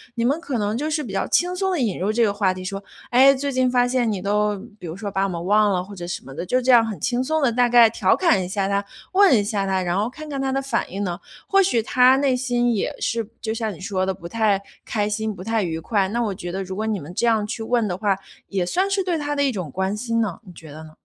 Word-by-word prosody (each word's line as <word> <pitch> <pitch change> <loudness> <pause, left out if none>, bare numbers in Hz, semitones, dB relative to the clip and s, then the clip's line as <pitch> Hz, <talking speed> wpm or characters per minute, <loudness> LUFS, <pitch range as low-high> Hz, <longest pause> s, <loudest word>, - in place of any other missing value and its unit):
你 235 -1 0
们 280 +6 +1
可 280 -7 -3
能 210 0 -1
就 300 +4 -2
是 305 0 -1
比 215 -7 -7
较 195 - -1
轻 355 +1 +1
松 380 +1 0
地 355 - 0
引 220 -9 -1
入 200 +4 0
这 235 +1 +2
个 205 -2 +2
话 200 -2 +1
题 185 0 -8
说， 195 +1 -5 0.3
哎， 265 +3 +7
最 280 +1 -2
近 255 -1 +2
发 245 0 +3
现 245 -3 +1
你 190 -3 -3
都， 210 +1 +1 0.2
比 180 - -8
如 165 +4 -6
说， 200 -1 -5
把 195 0 0
我 - - -2
们 170 -2 -4
忘 210 +1 +4
了 180 -1 0
或 200 - -11
者 175 -1 -7
什 175 - -5
么 135 - -10
的， - - -5
就 255 +7 +1
这 255 +1 +3
样 235 -2 +7
很 215 -3 -5
轻 245 +1 0
松 315 +3 0
地， 255 - +3
大 245 +1 +2
概 240 -1 +7
调 - - +2
侃 215 - +2
一 180 - -4
下 195 +1 -1
他、 200 0 0 0.3
问 380 - +6
一 205 - +1
下 200 -1 -1
他， 190 -1 0
然 175 +1 -1
后 215 +3 0
看 310 +4 -10
看 280 -2 -4
他 270 0 -1
的 270 - 0
反 270 - -2
应 195 +2 -3
呢？ 180 - -1 0.4
或 390 0 +4
许 300 -12 +2
他 255 +2 +5
内 270 -2 +2
心 245 -1 +1
也 205 - -2
是 230 -2 -1
就 220 - -2
像 220 -2 -3
你 - - -13
说 190 -1 -1
的 190 - -1
不 170 -2 -9
太 215 -3 +1 0.2
开 210 -2 -1
心、 215 0 -2
不 185 - -9
太 225 +1 0
愉 165 -3 -2
快。 195 +2 0
那 235 +4 -1
我 205 -3 -1
觉 175 -1 -6
得 195 +2 -3
如 190 0 -7
果 215 +2 -2
你 210 -3 -1
们 150 +5 -9
这 235 - 0
样 220 -2 +2
去 225 +1 -5
问 235 -1 +1
的 180 -2 -2
话， 200 -2 +1 0.3
也 190 -3 -1
算 375 - 0
是 390 -1 0
对 355 -3 -1
他 290 -1 -2
的 285 - +1
一 275 - +2
种 185 - -5
关 190 +6 -2
心 230 0 -1
呢， 200 -6 -2
你 180 - -12
觉 160 -3 -12
得 155 +2 -10
呢？ 155 - -13
220 Hz, 325 characters per minute, -22 LUFS, 195-250 Hz, 0.4 s, 哎